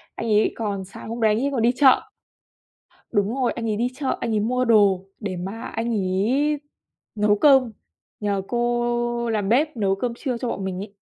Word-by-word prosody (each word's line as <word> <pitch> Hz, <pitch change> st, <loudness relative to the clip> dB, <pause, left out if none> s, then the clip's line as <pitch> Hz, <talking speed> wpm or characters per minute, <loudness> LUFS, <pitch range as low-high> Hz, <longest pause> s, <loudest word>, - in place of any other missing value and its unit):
Anh -, -, -4 dB
ấy 215 Hz, -1 st, +3 dB
còn 200 Hz, -4 st, -3 dB
sáng 195 Hz, +3 st, -10 dB
hôm 230 Hz, +1 st, -5 dB
đấy 220 Hz, -, +4 dB
anh 230 Hz, -, -1 dB
ấy 280 Hz, -, +1 dB
còn 250 Hz, -, -1 dB
đi 235 Hz, +2 st, +4 dB
chợ. 265 Hz, -2 st, +5 dB, 1.1 s
Đúng 205 Hz, +3 st, +1 dB
rồi, 255 Hz, -3 st, 0 dB
anh 230 Hz, -1 st, -4 dB
ấy 210 Hz, -, -1 dB
đi 240 Hz, +3 st, 0 dB
chợ, 270 Hz, 0 st, -2 dB
anh 230 Hz, -, -2 dB
ấy 210 Hz, -, +2 dB
mua 250 Hz, +4 st, 0 dB
đồ 200 Hz, -5 st, +4 dB
để 195 Hz, -4 st, -4 dB
mà 195 Hz, +6 st, -6 dB
anh 225 Hz, +1 st, -4 dB
ấy 225 Hz, +10 st, +1 dB, 0.5 s
nấu 210 Hz, -1 st, +2 dB
cơm 265 Hz, -4 st, +5 dB, 0.5 s
nhờ 200 Hz, -2 st, -1 dB
cô 240 Hz, 0 st, 0 dB
làm 210 Hz, -3 st, -1 dB
bếp 285 Hz, +4 st, +2 dB
nấu 195 Hz, -3 st, +1 dB
cơm 235 Hz, +5 st, -2 dB
trưa 250 Hz, -2 st, -3 dB
cho 245 Hz, 0 st, -3 dB
bọn 195 Hz, -, -3 dB
mình 185 Hz, -1 st, -3 dB
ấy. 200 Hz, 0 st, -8 dB
230 Hz, 205 wpm, -23 LUFS, 205-245 Hz, 1.1 s, chợ